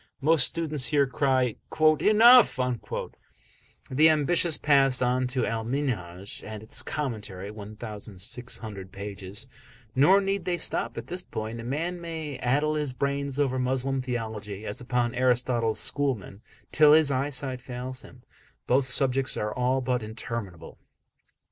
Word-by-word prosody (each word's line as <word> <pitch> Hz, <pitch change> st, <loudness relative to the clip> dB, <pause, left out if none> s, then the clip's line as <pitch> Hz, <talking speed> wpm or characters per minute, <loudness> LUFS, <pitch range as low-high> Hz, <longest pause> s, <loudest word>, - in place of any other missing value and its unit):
Most 150 Hz, -2 st, +5 dB
students 155 Hz, -5 st, -2 dB
here 145 Hz, -2 st, +3 dB
cry: 130 Hz, -3 st, +1 dB, 0.4 s
"Enough!" 225 Hz, -, +6 dB, 1.3 s
The 155 Hz, +5 st, +5 dB
ambitious 160 Hz, +2 st, +3 dB
pass 135 Hz, -3 st, +4 dB
on 125 Hz, 0 st, +1 dB
to 125 Hz, -1 st, -1 dB
Al 115 Hz, -1 st, -2 dB
Minhaj 105 Hz, -8 st, -3 dB
and 110 Hz, -1 st, -8 dB
its 110 Hz, -, -4 dB
commentary, 105 Hz, -9 st, -5 dB
(1600 105 Hz, -1 st, -7 dB
pages). 100 Hz, +2 st, -5 dB, 0.5 s
Nor 175 Hz, +9 st, +5 dB
need 195 Hz, -2 st, -2 dB
they 175 Hz, -1 st, 0 dB
stop 120 Hz, -7 st, -2 dB
at 115 Hz, -, -5 dB
this 180 Hz, +6 st, -5 dB
point. 110 Hz, -7 st, -6 dB
A -, -, -6 dB
man 165 Hz, +8 st, -3 dB
may 160 Hz, -5 st, -6 dB
addle 145 Hz, +5 st, +1 dB
his 150 Hz, -4 st, -2 dB
brains 140 Hz, +1 st, -2 dB
over 135 Hz, -3 st, +1 dB
Moslem 130 Hz, +1 st, 0 dB
theology, 110 Hz, -4 st, -5 dB
as 105 Hz, -, -4 dB
upon 125 Hz, -1 st, -1 dB
Aristotle's 125 Hz, -3 st, +1 dB
schoolmen, 120 Hz, -8 st, -1 dB, 0.3 s
till 150 Hz, -1 st, +6 dB
his 155 Hz, -2 st, +5 dB
eyesight 130 Hz, -1 st, -2 dB
fails 125 Hz, +1 st, -7 dB
him 125 Hz, -1 st, -16 dB, 0.4 s
both 130 Hz, +2 st, +2 dB
subjects 130 Hz, +1 st, +1 dB
are 105 Hz, 0 st, -2 dB
all 125 Hz, +1 st, 0 dB
but 125 Hz, -1 st, -1 dB
interminable. 110 Hz, -4 st, -6 dB
130 Hz, 135 wpm, -27 LUFS, 110-145 Hz, 1.3 s, Enough